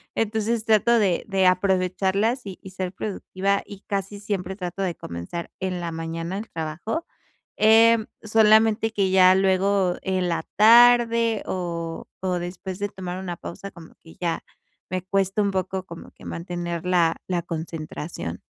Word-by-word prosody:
Entonces 220 Hz, +1 st, -1 dB
trato 230 Hz, +2 st, +4 dB
de 195 Hz, -5 st, +1 dB
de 195 Hz, -2 st, +2 dB
aprovecharlas 190 Hz, +5 st, +1 dB
y 190 Hz, -, -7 dB
y 190 Hz, -, -9 dB
ser 185 Hz, -1 st, -4 dB
productiva, 195 Hz, 0 st, -2 dB
y 200 Hz, -1 st, -10 dB
casi 200 Hz, 0 st, -4 dB
siempre 190 Hz, -2 st, -3 dB
trato 185 Hz, 0 st, -5 dB
de 180 Hz, -3 st, -1 dB
comenzar 85 Hz, -, -7 dB
en 185 Hz, -1 st, -2 dB
la 170 Hz, -1 st, -4 dB
mañana 165 Hz, +3 st, -4 dB
el 220 Hz, -, -8 dB
trabajo. 165 Hz, -, -4 dB, 0.5 s
Em, 225 Hz, +1 st, +6 dB
solamente 220 Hz, 0 st, +4 dB
que, 200 Hz, -3 st, +1 dB
ya 185 Hz, -1 st, +7 dB
luego, 190 Hz, -1 st, +2 dB
en 185 Hz, -1 st, -1 dB
la 170 Hz, -, -1 dB
tarde 230 Hz, 0 st, +6 dB
o 170 Hz, -2 st, -4 dB, 0.2 s
o 185 Hz, -1 st, -1 dB
después 180 Hz, +2 st, -6 dB
de 205 Hz, -, -2 dB
tomar 185 Hz, -2 st, -6 dB
una 175 Hz, -3 st, -5 dB
pausa, 200 Hz, +3 st, -8 dB
como 165 Hz, -2 st, -14 dB
que 165 Hz, -, -16 dB
ya 170 Hz, -2 st, -2 dB, 0.5 s
me 185 Hz, -1 st, -3 dB
cuesta 195 Hz, +2 st, 0 dB
un 200 Hz, -, +1 dB
poco 190 Hz, 0 st, -2 dB
como 170 Hz, -2 st, -10 dB
que -, -, -16 dB
mantener 170 Hz, -1 st, -4 dB
la 170 Hz, -2 st, +2 dB
la 175 Hz, -2 st, -1 dB
concentración. 160 Hz, -, -6 dB
190 Hz, 155 wpm, -24 LUFS, 175-210 Hz, 0.5 s, ya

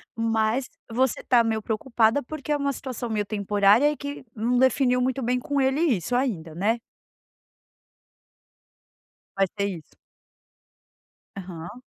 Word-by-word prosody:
mas 225 Hz, +2 st, 0 dB, 0.2 s
você 260 Hz, +2 st, 0 dB
tá 240 Hz, -2 st, +4 dB
meio 220 Hz, -1 st, -1 dB
preocupada, 225 Hz, +3 st, +1 dB
porque 300 Hz, +2 st, -6 dB
é 295 Hz, -, +3 dB
uma 280 Hz, -1 st, -1 dB
situação 255 Hz, -2 st, -5 dB
meio 210 Hz, -1 st, -1 dB
temporária 205 Hz, +6 st, +3 dB
e -, -, -4 dB
que 285 Hz, -1 st, -7 dB
não 240 Hz, +3 st, +1 dB
definiu 255 Hz, -1 st, +3 dB
muito 260 Hz, +1 st, 0 dB
bem 250 Hz, +1 st, 0 dB
com 285 Hz, +1 st, -1 dB
ele 265 Hz, +3 st, +2 dB
isso 245 Hz, -, +1 dB
ainda, 175 Hz, -, -1 dB
né? 220 Hz, +6 st, +1 dB, 2.6 s
Vai 195 Hz, -, +4 dB
ser 200 Hz, -, +1 dB
isso. 170 Hz, -6 st, -7 dB, 1.5 s
Aham. 180 Hz, +5 st, -8 dB
235 Hz, 130 wpm, -25 LUFS, 210-265 Hz, 2.6 s, tá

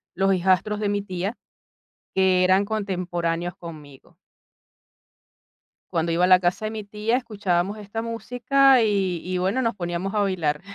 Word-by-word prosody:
los 195 Hz, +1 st, +2 dB
hijastros 190 Hz, +3 st, +1 dB
de 210 Hz, -1 st, 0 dB
mi 205 Hz, 0 st, -1 dB
tía, 185 Hz, +3 st, -4 dB, 0.8 s
que 190 Hz, -1 st, +3 dB
eran 190 Hz, +2 st, +4 dB
contemporáneos 175 Hz, -5 st, -2 dB
conmigo. 150 Hz, -5 st, -10 dB, 1.9 s
Cuando 165 Hz, 0 st, 0 dB
iba 175 Hz, -, +1 dB
a 180 Hz, -, +5 dB
la 185 Hz, -1 st, +7 dB
casa 180 Hz, +4 st, -1 dB
de 215 Hz, -, -2 dB
mi 215 Hz, -2 st, -6 dB
tía 215 Hz, +4 st, -1 dB
escuchábamos 205 Hz, -4 st, -1 dB
esta 210 Hz, +2 st, -5 dB
música, 245 Hz, +3 st, +3 dB
y 195 Hz, -5 st, +1 dB
y 185 Hz, 0 st, -2 dB
bueno 195 Hz, +8 st, 0 dB
nos 230 Hz, -3 st, 0 dB
poníamos 175 Hz, +2 st, -3 dB
a -, -, +2 dB
bailar. 170 Hz, -7 st, 0 dB
190 Hz, 150 wpm, -24 LUFS, 175-215 Hz, 1.9 s, la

